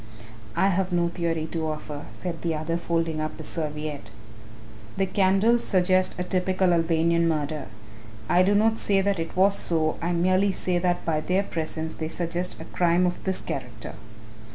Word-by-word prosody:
"I 195 - +3
have 190 0 0
no 175 -1 +2
theory 165 -2 -2
to 160 -2 -2
offer," 150 -1 -6
said 175 -3 -6
the 165 -2 -1
other, 155 +2 -2
folding 165 -2 -1
up 155 - -4
his 155 - -8
serviette; 150 -6 -4 0.9
"the 195 - +2
candles 195 +5 +3
suggest 185 -1 +2
a 180 - -1
typical 185 0 +1
Albanian 165 0 +2
murder. 150 -2 -1 0.6
I 175 - +4
do 200 +2 +3
not 220 +2 +3
say 195 -1 +2
that 200 -2 0
it 165 0 -4
was 195 +2 +5
so, 160 -4 0
I 170 +1 0
merely 185 +3 +2
say 180 -1 -1
that 175 0 0
by 160 -2 +1
their 185 +4 +1
presence 160 -2 -4
they 160 - -4
suggest 175 +2 -3
a - - -7
crime 175 0 +2
of 180 0 -2
this 190 -1 0
character." 120 -5 -6
170 Hz, 175 wpm, -25 LUFS, 160-185 Hz, 0.9 s, was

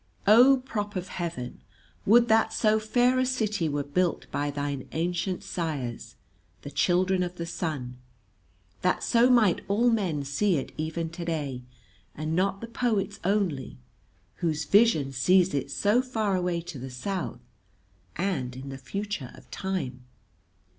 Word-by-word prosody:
O 245 +7 +7
Prop 210 -5 -4
of 185 0 -4
Heaven, 165 -8 -5 0.5
would 235 +3 +6
that 220 0 +4
so 220 -1 +2
fair 245 +4 +2
a 255 - +3
city 215 -9 0
were 145 0 -1
built 175 +5 0
by 145 0 -1
thine 145 -2 -3
ancient 175 +3 -1
sires, 145 -9 -4 0.5
the 145 - -7
children 185 +2 +2
of 180 0 -2
the 170 - -4
sun, 140 -8 -4 0.8
that 180 - +1
so 235 +2 +4
might 225 -8 +4
all 230 +5 +3
men 180 -10 0
see 170 +8 +1
it 135 - -4
even 160 +1 -3
today, 160 -7 -3 0.5
and 155 +2 -2
not 195 +2 +1
the 230 - -5
poets 220 -4 -1
only, 185 -9 0 0.6
whose 155 -3 -1
vision 200 -10 +4
sees 180 +7 +3
it 140 -1 -1
so 205 - +2
far 220 -6 -1
away 180 -2 0
to 165 -5 -8
the 130 +2 -6
South 170 +5 -4 0.7
and 150 -10 -2
in 135 +2 -7
the 135 0 -7
future 200 - -4
of - - -17
time. 135 -11 -4
180 Hz, 145 wpm, -27 LUFS, 145-210 Hz, 0.8 s, O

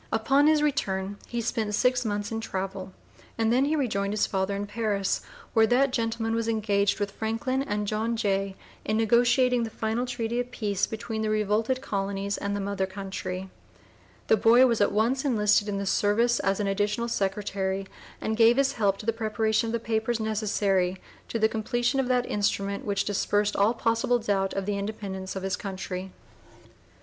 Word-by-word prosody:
Upon 275 +6 +3
his 305 -1 +4
return 200 -9 -1
he 240 0 -3
spent 220 -2 -1
six 250 +2 +2
months 205 -1 -2
in 225 0 -2
travel 190 -2 -4 0.5
and 225 0 +2
then 260 +3 +3
he 305 +2 +1
rejoined 205 -8 -1
his 210 - +2
father 190 0 -1
in 200 +1 -3
Paris, 205 -2 -1 0.3
where 220 -1 +5
that 255 +3 +3
gentleman 225 -1 -1
was 230 0 -1
engaged 205 -3 +1
with 205 -1 -1
Franklin 225 +6 -2
and 210 -5 -2
John 220 +3 -1
Jay 195 -2 0 0.3
in 215 - 0
negotiating 240 +2 +3
the 230 - -2
final 225 +3 -2
treaty 240 -1 -2
of 245 0 -2
peace 205 -5 -1
between 220 0 -4
the 215 - 0
revolted 215 +4 +1
colonies 200 -2 -2
and 200 0 -3
the - - -2
mother 195 -1 -2
country. 190 -1 -5 0.7
The - - +4
boy 235 +5 +6
"was 235 -4 +1
at 205 - +3
once 235 +6 +1
enlisted 210 -5 +2
in 200 - -2
the 200 - -2
service 220 +5 +2
as 195 +1 0
an 205 - 0
additional 205 +4 0
secretary, 195 -2 -2 0.3
and 220 - -2
gave 230 +2 +5
his 275 -1 +3
help 200 -4 +1
to 210 - -9
the 230 - +1
preparation 220 0 0
of - - -2
the 235 - 0
papers 225 +1 -1
necessary 200 -4 0 0.3
to - - -2
the 220 -1 +4
completion 240 +4 -1
of 265 - +1
that 250 -1 +2
instrument 200 -1 -1
which 200 -1 0
dispersed 205 +1 0
all 210 +4 +3
possible 230 +2 +1
doubt 200 -4 -1
of 195 -1 -2
the 205 0 -1
Independence 200 -2 -5
of 190 - -4
his 190 -1 0
Country." 190 -1 -5
215 Hz, 185 wpm, -27 LUFS, 200-230 Hz, 0.7 s, boy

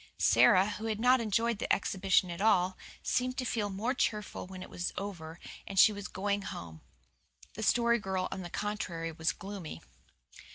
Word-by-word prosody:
Sara, 190 -1 +5
who 210 +1 -5
had 215 -1 -2
not 250 +2 +5
enjoyed 230 0 0
the - - -3
exhibition 190 -2 +2
at 170 - -5
all, 190 -4 +3 0.3
seemed 255 0 0
to 255 - -1
feel 215 -3 -1
more 210 +6 -1
cheerful 210 -7 -2
when 185 -1 -8
it - - -11
was 175 - -3
over 175 -4 -6 0.3
and 195 - -6
she 215 +3 +7
was 205 -1 -6
going 200 +1 -1
home. 80 - -8 0.7
The 220 - -7
Story 235 +2 +3
Girl 190 -3 -2
on 190 - -4
the 175 - -7
contrary 175 -5 -3
was 160 0 0
gloomy. 195 - -7
200 Hz, 175 wpm, -31 LUFS, 185-220 Hz, 0.7 s, she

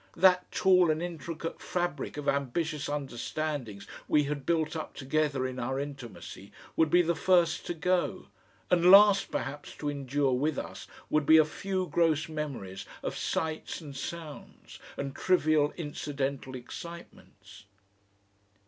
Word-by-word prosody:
That 180 -1 +4
tall 185 -4 +4
and 155 0 +1
intricate 165 -1 -5
fabric 175 -6 -3
of 145 - -5
ambitious 140 +2 -1
understandings 140 -4 -4 0.2
we 150 - +4
had 145 -1 -4
built 160 -1 +1
up 155 - -5
together 140 -1 0
in 130 0 -4
our 130 +2 -2
intimacy 135 -8 -8 0.2
would 160 -1 +3
be 175 +3 +5
the 170 0 +1
first 175 0 +2
to 175 - -2
go; 180 +2 0 0.5
and 175 0 +5
last 200 +1 +8
perhaps 145 +2 -5
to 145 - -3
endure 140 -1 0
with 145 +4 0
us - - -6 0.2
would 155 -2 +2
be 160 - +8
a 155 - +6
few 185 +4 -2
gross 165 -3 +2
memories 145 -12 -5 0.2
of - - -3
sights 160 -1 -2
and 145 -5 -10
sounds, 155 +1 -8 0.2
and 140 -1 -4
trivial 155 -5 +3
incidental 140 -4 -3
excitements.... 120 - -11
150 Hz, 140 wpm, -29 LUFS, 140-170 Hz, 0.5 s, last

